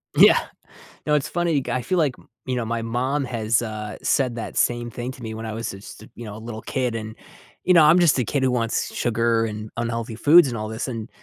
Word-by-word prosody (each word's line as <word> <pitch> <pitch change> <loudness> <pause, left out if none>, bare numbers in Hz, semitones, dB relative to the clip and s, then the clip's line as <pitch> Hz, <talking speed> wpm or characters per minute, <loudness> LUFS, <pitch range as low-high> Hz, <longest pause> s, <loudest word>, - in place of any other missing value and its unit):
Yeah. - - +7 0.7
No, 150 - +1
it's 145 - 0
funny, 170 -5 0
g - - -5
I 125 - 0
feel 185 +6 -1
like 150 -7 +1
m - - -21 0.2
you 130 -1 -2
know, 120 - -2
my 115 0 -2
mom 130 +5 -1
has, 115 -2 0
uh, 110 -2 -5
said 125 -4 +1
that 115 - -6
same 120 0 +1
thing 120 +2 -5
to 130 - -13
me 110 - -5
when 110 +1 -6
I 110 - -4
was 115 0 -4
just, 100 +2 -11
you 120 - -9
know, 105 -1 -7
a - - -8
little 110 -1 -7
kid, 125 -3 -2
and, 110 -1 -6 0.5
you 180 - +4
know, 165 - +7
I'm 155 +4 +6
just 165 -6 +4
a 125 - 0
kid 135 +4 -1
who 130 - +2
wants 115 -2 -1
sugar 115 -1 +1
and 105 0 -6
unhealthy 115 -1 -3
foods 150 +7 +6
and 120 -3 -3
all 110 0 -4
this, 110 +4 -4
and 115 -3 -5
120 Hz, 250 wpm, -23 LUFS, 110-130 Hz, 0.7 s, Yeah